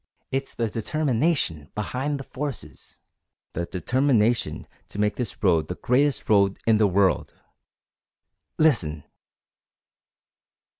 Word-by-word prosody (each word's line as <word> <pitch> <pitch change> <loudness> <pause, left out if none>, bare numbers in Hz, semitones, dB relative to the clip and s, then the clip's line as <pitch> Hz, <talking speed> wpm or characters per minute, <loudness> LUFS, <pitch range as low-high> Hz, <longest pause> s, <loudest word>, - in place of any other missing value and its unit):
It's 135 +1 -3
the 115 - 0
determination 115 - 0
behind 130 +7 -2
the - - -6
forces 140 -1 -7 0.6
the 85 +1 -3
determination 120 +2 +1 0.2
to - - -10
make 105 0 +1
this 125 -3 -5
road 85 -5 +3
the 90 - -4
greatest 135 +6 +1
road 100 -2 +3
in 110 -2 +4
the 105 - +5
world! 95 0 +1 1.2
Listen!" 80 - +2
115 Hz, 105 wpm, -25 LUFS, 100-135 Hz, 1.2 s, the